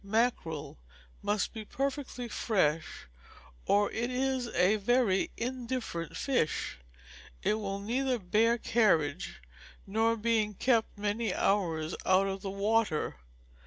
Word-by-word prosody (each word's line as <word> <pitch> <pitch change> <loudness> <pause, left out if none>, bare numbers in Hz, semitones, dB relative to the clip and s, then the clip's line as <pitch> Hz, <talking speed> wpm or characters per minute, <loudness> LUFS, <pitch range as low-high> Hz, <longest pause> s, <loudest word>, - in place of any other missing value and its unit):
Mackerel 200 - -1 0.4
must 205 -1 0
be 220 -2 -6
perfectly 265 0 -3
fresh, 175 -9 0 0.6
or 205 0 +3
it 235 +2 -2
is 260 -1 0
a 195 0 +3
very 215 -2 +2
indifferent 240 -8 -3
fish; 205 - 0 0.6
it - - +3
will 200 -2 -3
neither 250 +5 0
bear 225 +4 +2
carriage, 165 - +1 0.4
nor 225 +3 +1
being 215 -2 +1
kept 230 0 +1
many 210 0 -1
hours 165 -5 +1
out 185 +1 +4
of 195 0 -3
the 195 - -4
water. 205 -3 0
215 Hz, 115 wpm, -31 LUFS, 195-240 Hz, 0.6 s, out